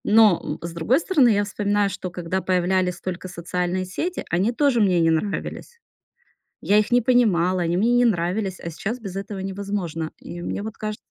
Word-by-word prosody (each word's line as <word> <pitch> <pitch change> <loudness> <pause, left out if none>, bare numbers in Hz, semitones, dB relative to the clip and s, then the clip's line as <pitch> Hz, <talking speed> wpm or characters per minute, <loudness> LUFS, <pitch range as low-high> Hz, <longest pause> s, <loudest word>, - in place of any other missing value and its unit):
Но, 210 -4 +4
э, - - -6
с 170 - -6
другой 170 - +2
стороны, 310 -8 +3
я 205 -2 +3
вспоминаю, 205 0 0
что 185 - -5
когда 180 +1 -3
появлялись 180 0 +1
только 185 0 -5
социальные 180 +1 -2
сети, 330 - -3
они 185 +7 +1
тоже 255 -2 +2
мне 185 -4 +3
не 165 -1 +3
нравились. 205 - -3 0.8
Я 205 - +3
их 215 - -1
не 245 0 +5
понимала, 190 -7 +3
они 170 0 0
мне 230 +5 +3
не 245 0 +4
нравились. 190 -1 0
А 170 - -6
сейчас 215 +9 -4
без 195 -5 -7
этого 195 0 -5
невозможно. 190 -4 -4
И 175 - -8
мне 200 - -4
вот 220 +1 -7
каж 215 0 -4
195 Hz, 190 wpm, -23 LUFS, 175-220 Hz, 0.8 s, не